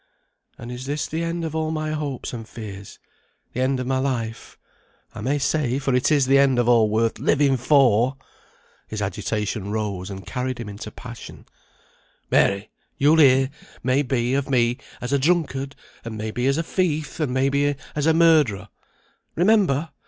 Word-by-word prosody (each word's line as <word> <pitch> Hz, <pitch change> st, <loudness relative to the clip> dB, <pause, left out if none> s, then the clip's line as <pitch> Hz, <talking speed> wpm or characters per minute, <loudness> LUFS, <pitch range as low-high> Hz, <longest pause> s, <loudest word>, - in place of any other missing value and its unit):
"And 120 Hz, -, -8 dB
is 125 Hz, +2 st, -7 dB
this 145 Hz, +1 st, -2 dB
the 160 Hz, +2 st, -3 dB
end 170 Hz, 0 st, -2 dB
of 160 Hz, -, -4 dB
all 160 Hz, 0 st, -1 dB
my 155 Hz, -1 st, -2 dB
hopes 145 Hz, -6 st, -4 dB
and 115 Hz, -2 st, -7 dB
fears? 100 Hz, -3 st, -9 dB, 0.6 s
the 125 Hz, -, -2 dB
end 130 Hz, 0 st, +1 dB
of 125 Hz, -, -3 dB
my 130 Hz, +1 st, 0 dB
life, 120 Hz, -4 st, -3 dB, 0.6 s
I -, -, -8 dB
may 135 Hz, +6 st, 0 dB
say, 140 Hz, -2 st, 0 dB
for 135 Hz, -1 st, -1 dB
it 125 Hz, +4 st, +2 dB
is 145 Hz, -3 st, +4 dB
the 135 Hz, +1 st, +4 dB
end 135 Hz, -2 st, +4 dB
of 120 Hz, -1 st, +2 dB
all 115 Hz, -3 st, +5 dB
worth 110 Hz, +1 st, 0 dB
living 140 Hz, -2 st, +3 dB
for!" 130 Hz, -1 st, +3 dB, 0.7 s
His 110 Hz, -, -5 dB
agitation 105 Hz, +1 st, -3 dB
rose 100 Hz, -4 st, -3 dB
and 95 Hz, -2 st, -8 dB
carried 125 Hz, +2 st, -3 dB
him 115 Hz, -, -5 dB
into 105 Hz, +1 st, -7 dB
passion. 120 Hz, +1 st, -10 dB, 0.9 s
"Mary! 100 Hz, +2 st, +2 dB, 0.3 s
you'll 150 Hz, +3 st, +4 dB
hear, 135 Hz, -2 st, +5 dB, 0.3 s
may 130 Hz, +2 st, +2 dB
be, 125 Hz, -2 st, 0 dB
of 140 Hz, 0 st, -1 dB
me 120 Hz, -2 st, +2 dB, 0.2 s
as 125 Hz, +3 st, -3 dB
a 140 Hz, -, +3 dB
drunkard, 140 Hz, -3 st, 0 dB, 0.3 s
and 115 Hz, -1 st, -6 dB
may 110 Hz, 0 st, -4 dB
be 125 Hz, +3 st, -1 dB
as 140 Hz, +2 st, +2 dB
a 165 Hz, -, 0 dB
thief, 160 Hz, -4 st, -1 dB
and 150 Hz, -5 st, 0 dB
may 130 Hz, +2 st, +2 dB
be 145 Hz, +1 st, +1 dB, 0.2 s
as 150 Hz, +1 st, 0 dB
a 160 Hz, -, +5 dB
murderer. 155 Hz, -, +3 dB, 0.7 s
Remember! 175 Hz, -6 st, +2 dB
130 Hz, 180 wpm, -23 LUFS, 115-145 Hz, 0.9 s, all